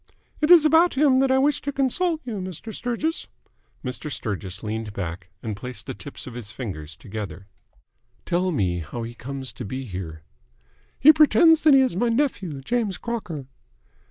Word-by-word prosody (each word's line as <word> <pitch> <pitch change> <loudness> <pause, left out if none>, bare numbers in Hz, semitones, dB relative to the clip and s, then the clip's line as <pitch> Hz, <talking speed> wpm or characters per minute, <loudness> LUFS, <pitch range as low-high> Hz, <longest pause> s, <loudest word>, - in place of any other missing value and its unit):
"It 300 - +2
is 345 -3 +8
about 325 +2 +5
him 270 -2 +4
that 270 0 +3
I 260 - +4
wished 285 +2 +2
to 285 - 0
consult 310 +5 0
you, 230 -4 -4
Mr. 185 +4 -6
Sturgis." 245 +9 -2 0.6
Mr. 130 +4 -5
Sturgis 100 -6 -5
leaned 110 -1 -4
back, 90 -2 -5
and 110 -2 -3
placed 120 +1 -7
the 130 - -5
tips 145 - -9
of 130 - -8
his 115 -3 -7
fingers 80 - -6
together. 100 -2 -7 0.8
"Tell 180 +1 +1
me 95 - 0
how 100 +9 -6
he 115 +1 -6
comes 130 +2 -6
to - - -7
be 130 +6 -5
here." 90 -7 -7 0.8
"He 310 +3 +9
pretends 320 +1 +6
that 305 -3 +6
he 270 - +7
is 255 -8 +1
my 235 +6 +1
nephew, 200 - -1
James 215 - -1
Crocker." 180 - -5
150 Hz, 175 wpm, -24 LUFS, -, 0.8 s, He